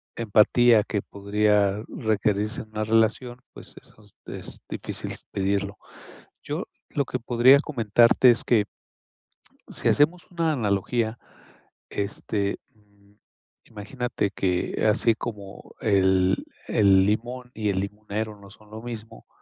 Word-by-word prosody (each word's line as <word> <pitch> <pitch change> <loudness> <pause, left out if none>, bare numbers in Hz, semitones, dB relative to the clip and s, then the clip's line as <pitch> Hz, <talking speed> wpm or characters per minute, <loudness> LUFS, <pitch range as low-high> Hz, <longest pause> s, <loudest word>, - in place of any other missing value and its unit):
empatía 115 +1 +4
que 105 -1 -2
podría 100 0 +1
requerirse 105 0 -1
en 110 - -13
una 110 0 -3
relación. 115 +3 +1
Pues - - -12
eso - - -21 0.3
es - - -8
difícil - - -6 0.2
pedirlo. 100 +1 -1 0.7
Yo - - -4 0.2
lo 140 -2 -1
que 125 - -4
podría 125 +3 +5
comentarte 120 -3 +4
es 115 - -1
que 110 -4 +2 1.1
si - - -1
hacemos 170 +6 +2
una 165 -2 0
analogía, 110 -1 -1 0.7
este, 100 0 -2 0.2
mm, 100 -1 -28 0.5
imagínate 110 -1 -3
que 90 +1 -1
así 115 +2 +2
como 105 -3 -8
el 95 -3 +2 0.2
el 95 -2 +4
limón 120 +4 -2
y 105 -1 -2
el 95 -1 0
limonero 105 +1 -5
no 100 -1 -14
son 105 +1 -18
lo 110 +1 -9
mismo, 115 -2 -9
105 Hz, 120 wpm, -25 LUFS, 100-120 Hz, 1.1 s, podría